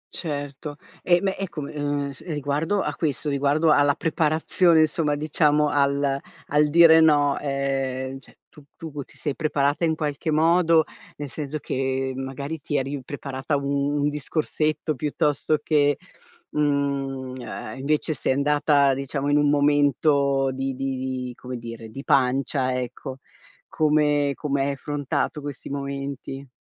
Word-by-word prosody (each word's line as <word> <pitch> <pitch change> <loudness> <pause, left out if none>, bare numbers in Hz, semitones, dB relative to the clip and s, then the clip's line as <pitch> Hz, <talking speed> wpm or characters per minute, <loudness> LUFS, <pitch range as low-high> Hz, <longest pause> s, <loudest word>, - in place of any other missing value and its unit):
Certo 145 -2 -5 0.3
e 175 0 +3
beh, 195 -1 -1
ecco, 170 -7 -4
ehm, 145 -1 -2
s 135 - -12
riguardo 150 +5 -1
a - - -2
questo, 150 -1 -2
riguardo 145 +3 +2
alla 145 -1 +4
preparazione 160 +1 +2
insomma, 155 -1 +1
diciamo 150 0 +2
al 140 -1 +1 0.3
al 150 +1 +3
dire 160 +1 +7
no, 145 -3 +4
ehm, 135 -1 -2
cioè - - -21
tu 150 - -17
tu 150 -3 -6
ti - - -14
sei 145 -3 -3
preparata 150 0 +1
in 160 - +1
qualche 150 0 -3
modo, 165 +1 +4 0.3
nel 145 -1 -5
senso 150 +2 -4
che 130 -1 -2
magari 135 +4 -5
ti 145 - -4
eri 135 +1 -2
preparata 140 +1 -3
un 140 +1 -1
un 145 - +2
discorsetto, 155 +1 -1
piuttosto 150 +2 0
che, 145 -2 +3 0.5
mhmm, 140 -3 -1
uhm, 120 -2 -7
invece 150 +3 0
sei 130 - 0
andata 145 0 +3
diciamo 140 +1 -3
in 145 - +4
un 145 -1 +3
momento 140 -1 +3
di 135 0 -3
di 135 0 -2 0.3
di, 125 - -6
come 125 +1 -7
dire, 115 -1 -8
di 135 +5 -8
pancia 130 -1 +1
ecco, 125 +1 -6 0.5
come 150 -2 +2
come 140 -2 -1
hai 140 +1 +1
affrontato 145 +1 -2
questi 145 -1 -7
momenti? 140 -1 -5
145 Hz, 140 wpm, -24 LUFS, 135-150 Hz, 0.5 s, dire